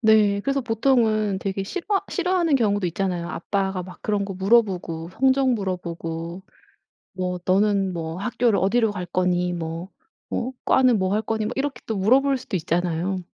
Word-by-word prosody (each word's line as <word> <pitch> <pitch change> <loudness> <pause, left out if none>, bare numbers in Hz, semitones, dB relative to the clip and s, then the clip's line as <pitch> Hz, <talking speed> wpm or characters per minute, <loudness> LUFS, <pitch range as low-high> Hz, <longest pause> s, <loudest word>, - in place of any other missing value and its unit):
네. 215 -3 +4
그래서 275 +5 0
보통은 225 -4 +2
되게 195 -1 -2
싫어 355 - -5 0.2
싫어하는 360 -4 +1
경우도 205 -6 +2
있잖아요. 175 -1 -2
아빠가 190 +1 -2
막 180 0 -12
그런 205 -2 0
거 195 - -5
물어보고 185 -5 +1
성적 265 +4 +2
물어보고 170 -4 -4 0.7
뭐 180 -1 -3
"너는 195 0 +2
뭐 165 -1 -4
학교를 235 +1 +1
어디로 220 +3 +2
갈 185 -3 -5
거니?" 180 0 0
뭐 165 +2 -5 0.4
어 255 +2 -2
"과는 255 -3 +4
뭐 190 0 0
할 215 - +1
거니?" 220 0 -2
뭐 215 - -2
이렇게 280 +1 -2
또 220 - -2
물어볼 265 +8 +3
수도 250 -5 -6
있잖아요. 175 +2 -1
200 Hz, 330 characters per minute, -23 LUFS, 180-230 Hz, 0.7 s, 네